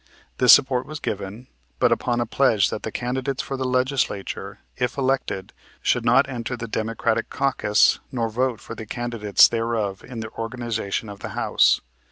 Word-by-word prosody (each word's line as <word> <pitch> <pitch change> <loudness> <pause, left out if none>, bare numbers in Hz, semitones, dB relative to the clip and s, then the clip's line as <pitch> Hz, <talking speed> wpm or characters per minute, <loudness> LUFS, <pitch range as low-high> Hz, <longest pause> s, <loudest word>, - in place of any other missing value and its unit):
This 125 -1 +7
support 130 -2 +5
was 155 0 -6
given, 105 +4 -5 0.3
but - - +3
upon 120 -1 +1
a - - 0
pledge 110 -4 +2
that - - -4
the 110 - -5
candidates 130 +3 -2
for 135 - -4
the 130 0 -3
Legislature, 130 -5 -1 0.2
if 125 +2 -2
elected, 130 -8 -1 0.3
should - - +1
not - - +4
enter 125 -1 -4
the 115 -1 -5
Democratic 115 +1 -1
caucus, 130 -6 +2
nor 115 -3 -1
vote 120 +1 -1
for - - -9
the 110 -1 -8
candidates 115 -4 +3
thereof 115 -4 -2
in 125 -3 -8
the 110 0 -7
organization 115 -2 -3
of 100 -1 -9
the - - -6
House. - - +3
120 Hz, 170 wpm, -23 LUFS, 110-130 Hz, 0.3 s, This